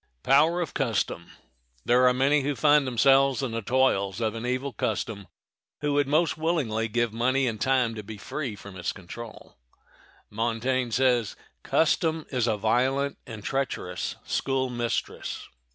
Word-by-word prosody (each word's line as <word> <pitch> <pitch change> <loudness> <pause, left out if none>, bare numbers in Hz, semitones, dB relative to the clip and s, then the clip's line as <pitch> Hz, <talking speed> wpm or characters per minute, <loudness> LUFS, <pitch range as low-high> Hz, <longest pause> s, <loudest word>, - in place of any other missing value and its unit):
] - - -46
There 125 - 0
are - - +6
many 140 +3 +3
who 145 +1 -1
find 145 +3 +4
themselves 135 +1 +4
in 130 - -2
the 115 0 -3
toils 105 -5 +1
of 110 -2 0
an 115 +1 -5
evil 130 +2 -2
custom 100 -1 -3 0.5
who 150 -1 0
would 145 -1 +2
most 155 +2 +1
willingly 135 -10 0
give 120 0 0
money 130 +4 +1
and 110 -4 -3
time 130 -3 +2
to 110 - -6
be 105 +1 -9
free 125 +2 -5
from 100 -1 -11
its 90 0 -2
control. 105 - -11 0.7
Montaigne 120 +3 -1
says, 120 -3 +1 0.3
"Custom 160 0 +1
is 125 -3 0
a 110 -2 +1
violent 130 +6 +1
and 110 -3 -8
treacherous 105 -9 -3
school 130 -1 -1
mistress. 120 -1 -3
125 Hz, 145 wpm, -26 LUFS, 110-135 Hz, 0.7 s, are